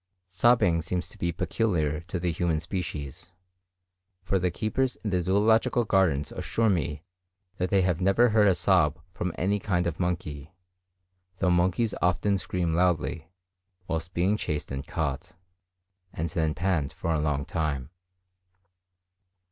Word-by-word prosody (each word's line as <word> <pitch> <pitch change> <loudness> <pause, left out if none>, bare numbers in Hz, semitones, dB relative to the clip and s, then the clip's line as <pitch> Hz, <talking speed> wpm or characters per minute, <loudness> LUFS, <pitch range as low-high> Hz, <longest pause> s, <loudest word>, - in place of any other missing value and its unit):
Sobbing 90 -3 +3
seems 90 +2 -3
to - - -13
be 85 - 0
peculiar 80 -5 0
to 90 - -3
the 85 0 0
human 85 -1 0
species; 80 -2 -5 0.9
for 95 +1 +1
the 90 0 +1
keepers 120 +8 -1
in 105 - -2
the 90 -1 +1
Zoological 110 +6 +3
Gardens 90 -8 +2
assure 115 -2 0
me 75 -4 -2 0.5
that 90 0 -1
they 95 0 +3
have 90 -1 0
never 100 +6 +4
heard 105 -1 +4
a 95 - +4
sob 75 -3 +3 0.2
from 90 -2 -2
any 100 +4 +1
kind 90 -2 0
of 85 -2 -3
monkey; 80 -3 -3 0.8
though 90 -2 +2
monkeys 95 +5 +2
often 95 +3 +2
scream 85 +1 -1
loudly 85 -2 0 0.6
whilst 80 +2 -3
being 95 +5 +2
chased 75 -8 -3
and 70 +2 -5
caught, 80 +3 -3 0.8
and 85 +1 -3
then 80 -1 0
pant 85 -7 0
for 85 - -2
a 80 - +1
long 75 -2 0
time. 75 -6 -2
90 Hz, 145 wpm, -27 LUFS, 80-95 Hz, 0.9 s, never